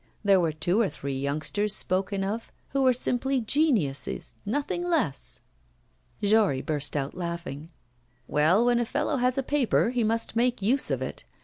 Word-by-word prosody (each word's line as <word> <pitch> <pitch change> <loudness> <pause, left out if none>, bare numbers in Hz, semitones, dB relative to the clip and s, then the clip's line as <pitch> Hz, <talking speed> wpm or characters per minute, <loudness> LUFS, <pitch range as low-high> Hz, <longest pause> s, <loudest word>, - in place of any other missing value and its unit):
There 200 -2 +5
were 165 -3 +1
two 175 +8 0
or 205 - +1
three 140 0 -5
youngsters 155 +10 -1
spoken 195 +1 -1
of 215 +4 -4 0.2
who 275 - 0
were 260 -1 +5
simply 255 +2 0
geniuses, 225 - 0
nothing 290 +9 -1
less.' 320 - -2 0.8
Jory 205 -10 +3
burst 150 -2 0
out 140 -1 -3
laughing. 170 -4 -5 0.6
'Well, 170 +10 +3
when 240 -1 +3
a 240 - 0
fellow 290 +4 -1
has 250 +1 +1
a 270 - 0
paper, 260 -4 +1
he 245 -2 0
must 225 +1 0
make 245 +1 +1
use 240 +8 +1
of - - -1
it. - - -6
210 Hz, 165 wpm, -27 LUFS, 165-250 Hz, 0.8 s, There